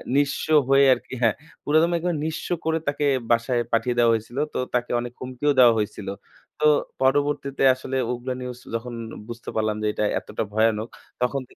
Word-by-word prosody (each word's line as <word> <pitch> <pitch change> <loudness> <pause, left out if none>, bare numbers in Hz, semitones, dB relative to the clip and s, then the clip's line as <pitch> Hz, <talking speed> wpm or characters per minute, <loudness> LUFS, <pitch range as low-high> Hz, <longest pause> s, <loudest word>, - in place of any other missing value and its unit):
নিঃস্ব 145 0 +1 0.2
হয়ে 135 0 +6
আরকি 125 - -7
হ্যাঁ, 115 -2 +4 0.3
পুরাদমে 160 +3 +3
একবারে 170 0 -1
নিঃস্ব 160 +2 -4 0.2
করে 160 0 +1
তাকে 145 +1 0 0.3
বাসায় 120 +1 +2
পাঠিয়ে 120 +2 +1
দেয়া 120 -1 +5
হয়েছিল। 115 +3 -4 0.2
তো - - -3 0.2
তাকে 125 0 0
অনেক 120 0 -5
হুমকিও 130 +3 -1
দেওয়া 120 -2 +8
হয়েছিল। 105 -1 -3 0.5
তো 150 - +1 0.4
পরবর্তীতে 140 0 +1
আসলে 130 +1 -4
ওগুলো 125 +1 -4
নিউজ 125 -1 -6 0.2
যখন 120 +1 -4 0.3
বুঝতে 120 0 -7
পারলাম 110 -1 0
যে, 105 - +1
এটা - - -1 0.2
এতটা 105 - -4
ভয়ানক 110 0 +2 0.3
তখন, 135 +2 0
125 Hz, 165 wpm, -24 LUFS, 115-140 Hz, 0.5 s, দেওয়া